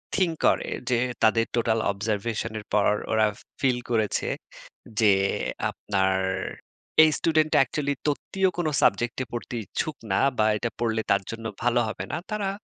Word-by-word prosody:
Think 180 -4 +2
করে - - +2 0.2
যে, 125 - +3 0.3
তাদের 115 +1 +4
টোটাল 115 -1 +2
Observation 110 +2 -2
এর 105 - -11
পর। 105 -1 +4 0.2
ওরা 110 -1 +4 0.3
ফিল 130 -3 +3
করেছে 110 -3 +1 0.7
যে 105 -3 +6 0.6
আপনার 95 -2 0 0.9
এই 155 - +6
স্টুডেন্টটা 155 -1 +3
Actually 145 +2 -2
তত্ত্বীয় 190 +6 +1
কোন 170 -3 0 0.2
সাবজেক্ট 120 +4 +2 0.2
পড়তে 120 +1 -5
ইচ্ছুক 155 - -3 0.2
না - - +3 0.2
বা 110 - +3
এটা 120 +2 -2
পড়লে 110 -1 0
তার 100 0 +4
জন্য 115 0 -7 0.2
ভালো 120 0 +3
হবে - - -4
না। - - 0
তারা 205 -2 -1
115 Hz, 145 wpm, -26 LUFS, 110-145 Hz, 0.9 s, যে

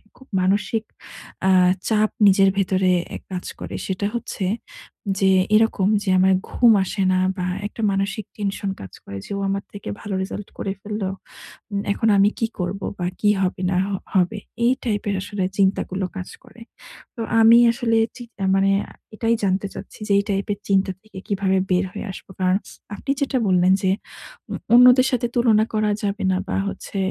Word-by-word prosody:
খুব 265 - -18
মানসিক 205 +4 +1 0.6
আ - - +5 0.4
চাপ 215 -1 +2 0.2
নিজের 195 0 +5
ভেতরে 190 -1 +2 0.2
এ - - -3
কাজ 180 -1 -4
করে। - - -6
সেটা 190 +1 -2
হচ্ছে 230 -4 -3 0.7
যে, 190 -1 +4 0.2
এরকম 215 -3 +3 0.2
যে 195 - -2
আমার 190 +1 +5 0.2
ঘুম 240 -2 +5
আসে 195 +2 -3
না 185 - +2 0.2
বা 180 - -2 0.2
একটা 220 - -9
মানসিক 195 +2 -2
tension 200 -1 -2
কাজ 95 - -10
করে 100 - -8
যে, - - -12
"ও - - -3
আমার 195 0 -2
থেকে 205 - -7
ভালো 205 - -5
result 200 +1 -6
করে 195 - -3
ফেলল! 210 0 -4 0.7
উম 200 0 -1
এখন 225 - -1
আমি 200 +1 +5
কি 225 - +1
করব? 180 +2 -2 0.2
বা 175 - -1
কি 210 - +3
হবে 185 0 -1
না 180 - +1
হ - - -4 0.2
হবে!" 190 +2 +2 0.3
এই 245 - +5
টাইপের 205 -3 -1
আসলে 205 0 -3
চিন্তাগুলো 190 -1 +1
কাজ 185 - -6
করে। 235 - -17 0.5
তো 230 - -5 0.2
আমি 225 +1 +8
আসলে 230 -1 0 0.2
চি 245 - -8 0.2
আ - - +2
মানে 195 0 +3 0.2
আ - - -14 0.2
এটাই 230 +1 +1
জানতে 195 0 +1
চাচ্ছি - - -10
যে 205 - +2
এই 200 - +2
type 200 +2 -1
এর 200 - -10
চিন্তা 195 0 +2
থেকে 215 -3 -15
কিভাবে 195 -1 +1
বের 180 +1 +3
হয়ে 205 - -6
আসব? 190 - -11
কারণ 185 0 +3 0.4
আপনি 275 - -3
যেটা 275 -1 +1
বললেন 185 0 +4
যে, 190 - +3 0.6
"উম - - -2 0.2
অন্যদের 250 +1 +7
সাথে 245 -2 0
তুলনা 230 -3 +4
করা 215 -1 +1
যাবে 200 0 -2
না 185 - +1
বা - - 0
হচ্ছে 200 - -6
200 Hz, 185 wpm, -22 LUFS, 190-215 Hz, 0.7 s, আমি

